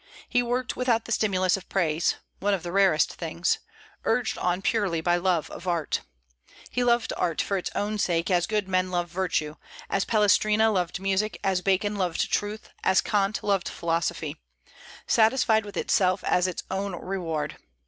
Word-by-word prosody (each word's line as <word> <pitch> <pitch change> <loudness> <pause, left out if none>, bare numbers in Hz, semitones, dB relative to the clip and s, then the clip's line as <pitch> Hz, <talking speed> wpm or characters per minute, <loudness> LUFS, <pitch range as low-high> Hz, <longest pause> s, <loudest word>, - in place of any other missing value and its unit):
He 245 - +2
worked 245 +1 -1
without 240 -3 +1
the - - -7
stimulus 190 -4 +2
of 195 - -12
praise, 165 -3 +1 0.2
one 205 0 +2
of 185 - -7
the 175 - -4
rarest 190 -5 +3
things, 170 +1 -1 0.4
urged 230 0 +1
on 180 +1 0
purely 205 -7 +1
by 175 +2 +2
love 175 -3 0
of 185 - -9
art. 170 -3 0 0.7
He 250 - 0
loved 240 -1 +2
art 170 -3 -1
for 200 - 0
its 185 - -2
own 210 +1 -1
sake, 175 -1 0
as 175 -1 +2
good 210 -3 -1
men 185 -1 +1
love 175 -1 -1
virtue, 170 -4 -1 0.3
as 195 - +2
Palestrina 215 +1 +3
loved 180 -3 -1
music, 195 +2 -1
as 190 -2 +1
Bacon 200 +2 +1
loved 180 -4 -1
truth, 210 +1 -2
as 190 - +4
Kant 205 0 0
loved 200 -3 +1
philosophy, 165 -2 -2 0.7
satisfied 220 -1 +3
with 200 -3 -8
itself 185 0 +2
as 180 +1 +2
its 185 - -4
own 195 -1 -2
reward. 170 -4 -3
190 Hz, 170 wpm, -26 LUFS, 175-210 Hz, 0.7 s, as